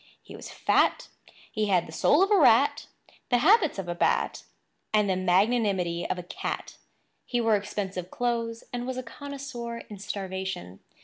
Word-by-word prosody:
He - - -11
was - - -9
fat; - - +1 0.4
he 215 -2 -1
had 185 -3 +2
the - - -10
soul 290 - +4
of 395 - 0
a - - +7
rat, - - +4 0.4
the 245 - +4
habits 325 - +4
of 190 -2 -4
a 175 - -2
bat, 175 - 0 0.5
and 210 -1 +3
the 190 - +1
magnanimity 185 -2 +1
of - - -1
a 180 - -6
cat... 175 - -5 0.5
He 245 - -2
wore 225 -2 +3
expensive 195 -3 -4
clothes; 230 -1 -2
and 245 0 -3
was 260 -1 -3
a 255 - -3
connoisseur 265 -2 -7
in 205 - -8
starvation. 190 - -5
210 Hz, 170 wpm, -27 LUFS, 185-245 Hz, 0.5 s, a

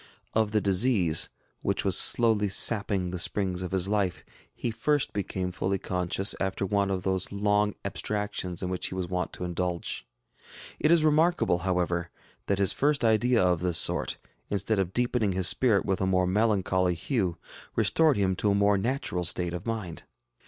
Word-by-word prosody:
Of 110 -1 +1
the 105 -1 +1
disease, 95 -5 +3 0.3
which - - -2
was - - +4
slowly 110 -4 +4
sapping 100 -2 +2
the 90 - -4
springs 95 0 +1
of 90 - -4
his 95 0 +1
life, 100 -3 -1 0.3
he 120 - -4
first 145 +6 0
became 95 -2 -3
fully 95 +3 -2
conscious 90 +2 -1
after 95 0 -2
one 100 0 0
of 95 -2 -2
those 95 -1 -1
long 105 0 0
abstractions 105 -4 -3
in 90 - -3
which 90 - -2
he - - -7
was 90 -1 -3
wont 90 -1 -3
to - - -7
indulge. 90 -6 -3 0.7
It 150 - +2
is 165 -2 +4
remarkable, 155 - +2
however, 90 -1 -1 0.4
that 100 - 0
his 100 0 +3
first 145 -3 +1
idea 115 0 +3
of 90 -2 +1
this 90 -1 +1
sort, - - +2 0.3
instead 100 +1 -1
of 95 -2 -1
deepening 120 -3 0
his 90 -1 +3
spirit 115 -6 +3
with 95 -1 -1
a 95 - +1
more 95 -1 +2
melancholy 95 -3 +1
hue, 95 - -2 0.4
restored 160 -6 +2
him 95 -2 +1
to 105 - 0
a 100 - +2
more 100 0 +2
natural 115 -5 -2
state 85 0 -1
of 90 +5 -6
mind. 105 -8 -5
95 Hz, 175 wpm, -27 LUFS, 90-110 Hz, 0.7 s, was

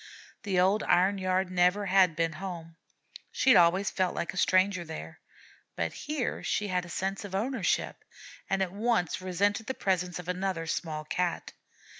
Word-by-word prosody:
The 195 -3 0
old 195 +4 +3
iron 190 +3 +2
yard 185 0 0
never 180 +3 +2
had 185 -3 +4
been 165 0 0
home, 170 -4 -7 0.6
she 265 - +3
had - - +8
always 180 +4 +4
felt 185 -2 0
like 170 - -3
a - - -9
stranger 185 0 +2
there; 160 -1 -8 0.6
but - - -2
here 300 -4 -3
she 205 -1 -1
had 180 -1 -1
a - - -11
sense 195 +3 -3
of 195 -2 -6
ownership, 225 0 -1 0.5
and 195 0 +1
at 180 - -4
once 205 -6 0
resented 200 +4 0
the 260 - -3
presence 180 -2 -1
of 180 -1 -8
another 180 -2 -2
small 155 -1 -3
Cat. 175 +2 -2
185 Hz, 170 wpm, -29 LUFS, 175-200 Hz, 0.6 s, had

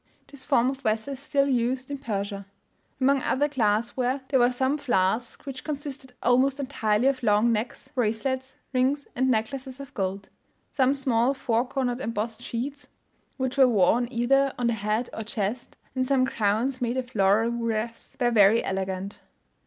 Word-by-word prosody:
This 280 -2 -11
form 255 -2 +3
of 270 0 -9
vessel 220 +3 -1
is 265 - -8
still 280 0 +1
used 255 +1 0
in 280 - -4
Persia. 200 -4 -4 0.5
Among 275 +1 +3
other 285 +4 +1
glass 230 -4 0
ware, 255 +2 0
there 265 - +3
were 245 0 +5
some 260 +4 0
flasks 230 -2 0
which 265 -2 -6
consisted 280 -3 -6
almost 260 +3 +3
entirely 240 -5 0
of 270 -1 +2
long 215 +1 +3
necks, 225 +2 -3
bracelets, 260 +2 -1 0.2
rings 265 +3 +1
and 260 +1 +2
necklaces 255 +3 -2
of 275 -1 -9
gold; 195 0 -3 0.5
some 265 0 +3
small 260 -1 +1
four 240 -2 0
cornered 255 -2 -2
embossed 225 -2 -3
sheets, 275 +5 -5 0.5
which 260 +1 -2
were 265 - +8
worn 230 +2 +3
either 270 +3 +2
on 245 - -1
the 235 - +2
head 215 +3 -1
or - - -4
chest, 215 +2 -4 0.2
and 255 - 0
some 255 0 +2
crowns, 235 +4 0
made 240 +1 0
of 255 0 -4
laurel 210 +3 +3
wreaths, 230 -1 -3
were 240 -1 +2
very 215 0 +5
elegant. 190 0 -3
245 Hz, 170 wpm, -26 LUFS, 220-270 Hz, 0.5 s, were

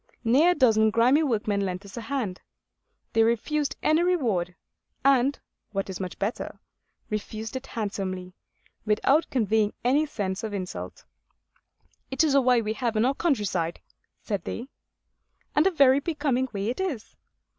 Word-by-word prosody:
Near 265 +9 +5
a 360 - +3
dozen 220 -6 +4
grimy 245 +7 +4
workmen 215 -7 0
lent 185 +1 -4
us 195 - -11
a 235 - -5
hand. 225 -8 -3 0.7
They 225 - +4
refused 275 +6 +1
any 310 +2 +4
reward; 230 - 0 0.5
and, 275 0 +4 0.4
what 195 -1 -2
is 185 - -6
much 185 -2 -5
better, 205 +4 -3 0.5
refused 215 +2 -4
it 260 +1 -5
handsomely, 190 -4 -4 0.5
without 245 +9 +2
conveying 220 -3 +1
any 280 +6 +3
sense 200 -8 -3
of 215 -2 -3
insult. 185 -2 -6 1.0
'It 265 +4 +2
is 305 -3 +2
a 275 - +5
way 250 -2 +3
we 215 0 -1
have 235 -1 -2
in 215 +2 +3
our 265 - +2
countryside,' 205 - -1 0.4
said 205 -3 -2
they. 245 +4 -5 0.9
And 300 +5 +5
a - - +5
very 275 -5 +5
becoming 285 -5 0
way 200 +1 -2
it 250 - -3
is. 320 - -3
230 Hz, 155 wpm, -26 LUFS, 205-275 Hz, 1.0 s, Near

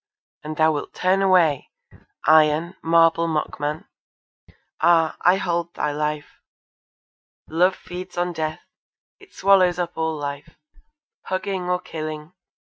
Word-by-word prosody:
And 155 0 -6
thou 160 0 +4
wilt 145 -2 -5
turn 185 +2 +1
away, 180 -6 +3 0.6
Iron, 155 +3 +4
marble 165 0 +3
mockman! 150 -1 -3 1.0
Ah! 165 -2 +3
I 180 +2 +5
hold 170 -2 -2
thy 150 - -1
life! 150 0 -4 1.1
Love 180 +4 +2
feeds 180 0 -9
on 175 0 -1
death. 155 -1 -4 0.6
It 405 -1 -19
swallows 185 -3 +4
up 175 -1 -3
all 160 -1 -2
life, 145 -1 -7 0.7
Hugging, 185 -1 -3
or 180 0 +1
killing. 155 -1 -7
165 Hz, 120 wpm, -22 LUFS, 155-180 Hz, 1.1 s, I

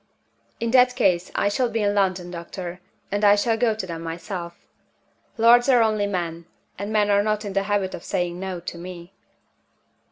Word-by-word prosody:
"In 230 0 -1
that 250 0 +5
case, 180 -2 +1
I - - +2
shall 240 +4 +1
be 225 -1 -1
in 205 0 +2
London, 185 -3 0
doctor; 175 +1 -7 0.3
and 205 +1 -1
I 205 0 +7
shall 225 +2 +1
go 225 -1 +1
to 215 - -4
them 165 -2 -6
myself. 170 +1 -6 0.7
Lords 240 +3 +6
are 245 -3 +6
only 215 -2 +1
men; 170 -3 -4 0.3
and 200 +2 -4
men 210 -1 +2
are 200 0 +4
not 215 0 -1
in 200 - -5
the 195 - +2
habit 200 -1 -1
of - - -7
saying 175 0 -2
No 190 -2 -4
to 170 0 -7
me." 175 +1 -9
200 Hz, 190 wpm, -23 LUFS, 175-215 Hz, 0.7 s, I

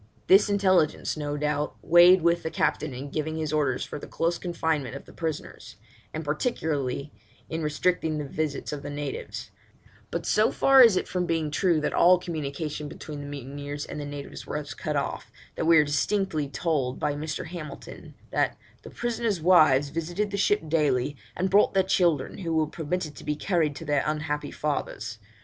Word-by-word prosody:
This 195 +2 +6
intelligence, 185 -6 +2
no 145 -1 -3
doubt, 150 0 -1
weighed 175 +1 +7
with 170 0 +3
the 160 - -3
Captain 155 -1 0
in 135 +3 -7
giving 155 +1 -2
his 155 -1 -2
orders 140 -4 +1
for - - -7
the - - -9
close 170 +1 -1
confinement 160 -7 -2
of 140 - -8
the - - -15
prisoners; 160 -2 -5 0.4
and 155 0 -5
particularly 145 - -2 0.4
in 160 0 -2
restricting 155 +1 0
the 150 - -3
visits 150 +1 -3
of 145 - -5
the 145 - -6
natives; 145 -1 -5 0.6
but - - -3
so 215 +1 +3
far 270 -1 +6
is 225 -6 +7
it - - -1
from 180 -1 -1
being 160 -2 0
true 170 +1 +2
that 150 - -1
all 180 +1 +6
communication 150 -3 -4
between 150 0 -8
the 145 - -7
mutineers 145 +1 -6
and - - -7
the - - -5
natives 145 -1 -8
was 150 -1 -4
cut - - -3
off, - - -3 0.2
that - - -3
we 165 0 +6
are 150 - +7
distinctly 155 0 0
told 135 -2 -1
by 145 - 0
Mr. 150 +1 -4
Hamilton, 160 -3 -9 0.2
that - - +1 0.2
'the - - -10
prisoners' 230 -5 -1
wives 155 -5 +5
visited 175 +7 -2
the - - -2
ship 205 -3 +2
daily, 145 -3 +1 0.2
and 185 +1 0
brought 200 0 +4
their 190 - +5
children, 170 -7 +1
who 165 -4 -2
were 160 -1 +3
permitted 155 0 -4
to - - -11
be 150 0 -1
carried 160 -3 0
to 165 - -8
their 145 -2 +2
unhappy 150 -1 -2
fathers. 140 -7 -3
155 Hz, 185 wpm, -26 LUFS, 145-175 Hz, 0.6 s, weighed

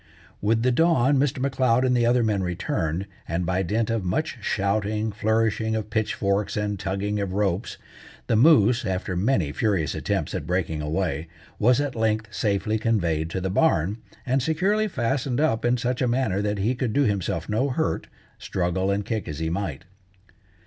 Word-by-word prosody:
With 115 +2 +1
the 125 - +3
dawn 145 -1 +3
Mr. 135 -1 +1
M'Leod 130 -2 +2
and 125 -1 +2
the 120 -1 +3
other 120 0 +3
men 105 -3 +1
returned, 90 -1 -2 0.2
and 85 +1 -1
by 90 +2 0
dint 110 +5 0
of 115 -3 -1
much 130 - -2
shouting, 105 +2 0
flourishing 110 +1 0
of 110 -1 -4
pitchforks, 105 -2 0
and 105 -1 -2
tugging 100 +2 -2
of 100 -2 -2
ropes, 100 0 -1 0.5
the - - +1
moose, 120 -2 +5
after 95 -2 -2
many 95 - +1
furious 95 -5 0
attempts - - -2
at 75 - -4
breaking 85 -3 -1
away, 80 0 -2 0.3
was 120 +4 +4
at 145 -2 -1
length 110 -1 -1
safely 110 0 0
conveyed 85 -8 0
to 95 - -3
the 95 0 -2
barn, 100 - +2 0.3
and 130 +1 +1
securely 190 - +1
fastened 130 - -1
up 130 -8 +1
in 120 +1 +2
such 125 +1 -2
a 125 - +2
manner 120 -6 0
that 105 0 -1
he 105 +6 +1
could 125 -3 -2
do 145 - +3
himself 95 -7 -1
no 115 +7 0
hurt, 160 +5 -1 0.3
struggle 95 +1 -1
and 100 0 0
kick 110 0 -3
as 75 -3 -5
he 80 0 -2
might. 85 -4 -3
105 Hz, 175 wpm, -25 LUFS, 95-125 Hz, 0.5 s, moose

